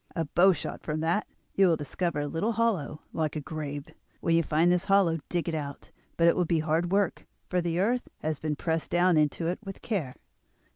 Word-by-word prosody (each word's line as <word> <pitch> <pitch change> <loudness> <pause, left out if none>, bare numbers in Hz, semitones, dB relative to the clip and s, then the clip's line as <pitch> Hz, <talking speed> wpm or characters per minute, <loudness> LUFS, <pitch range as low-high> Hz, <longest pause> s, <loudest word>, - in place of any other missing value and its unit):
A 165 -2 0
bow 175 +6 +5
shot 155 -5 -4
from 155 0 -3
that 170 +6 0 0.3
you 195 -1 +5
will 165 -2 +3
discover 150 +2 -2
a 145 - -2
little 195 +10 -1
hollow 205 -10 0
like 155 -1 -1
a - - -1
grave. 145 -1 -5 0.3
When 165 - +2
you 165 - +5
find 160 +2 +2
this 180 +1 +1
hollow 190 -5 +3
dig 175 -1 -1
it 170 - -1
out; 145 -3 -5 0.3
but 170 - +4
it 170 - +5
will 180 - +2
be 170 0 +1
hard 165 +3 0
work, 200 -2 0 0.2
for 180 -1 +2
the 170 -1 -1
earth 240 +6 +1 0.2
has 155 -1 -1
been 155 -1 -2
pressed 160 +2 -2
down 175 0 +3
into 155 +2 +1
it 175 +2 -1
with 195 -2 -8
care. 170 - -2
165 Hz, 220 wpm, -28 LUFS, 155-180 Hz, 0.3 s, bow